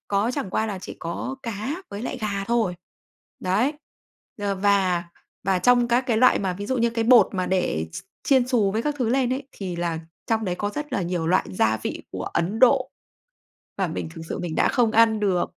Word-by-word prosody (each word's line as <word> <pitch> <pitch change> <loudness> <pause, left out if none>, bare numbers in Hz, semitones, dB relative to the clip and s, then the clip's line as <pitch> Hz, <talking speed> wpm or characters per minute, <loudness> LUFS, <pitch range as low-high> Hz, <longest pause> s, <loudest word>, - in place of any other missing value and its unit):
có 205 +4 +1
chẳng 270 -10 -3
qua 220 +4 0
là 200 -3 -4
chỉ - - -8
có 170 +11 -4
cá 235 - -4
với 200 +3 -6
lại 255 +1 -4
gà 200 -2 -2
thôi. 225 -6 +1 0.7
Đấy. 215 +11 +1 0.7
D - - -8 0.2
và 190 -4 +3 0.4
và 190 -1 +2
trong 245 +4 +4
các 240 +1 +4
cái 230 -3 +1
loại 255 +3 +5
mà 190 -2 -1
ví 205 +2 -6
dụ 260 - 0
như 235 0 +2
cái 230 -1 -1
bột 235 -4 +7
mà 185 -1 -1
để 175 - 0
x - - -5 0.2
chiên 260 -3 +3
xù 220 -6 +2
với 220 +2 0
các 295 -1 -1
thứ 240 -3 +1
lên 255 0 +2
ấy 265 +1 -3
thì 185 -3 -5
là 170 -2 -1 0.3
trong 225 -1 0
đấy 180 -2 -1
có 205 +3 -2
rất 295 +3 -6
là 200 - 0
nhiều 170 -2 -2
loại 185 +2 +2
gia 110 +4 +2
vị - - -5
của - - -4
Ấn 195 +6 -1
Độ. 260 +1 +4 0.9
Và 190 -2 +1
mình 160 0 -4
thực 165 - -7
sự - - -3
mình 170 -3 -4
đã - - +3
không 235 -3 +2
ăn 225 -1 +4
được. 190 -4 +1
210 Hz, 225 wpm, -24 LUFS, 185-245 Hz, 0.9 s, bột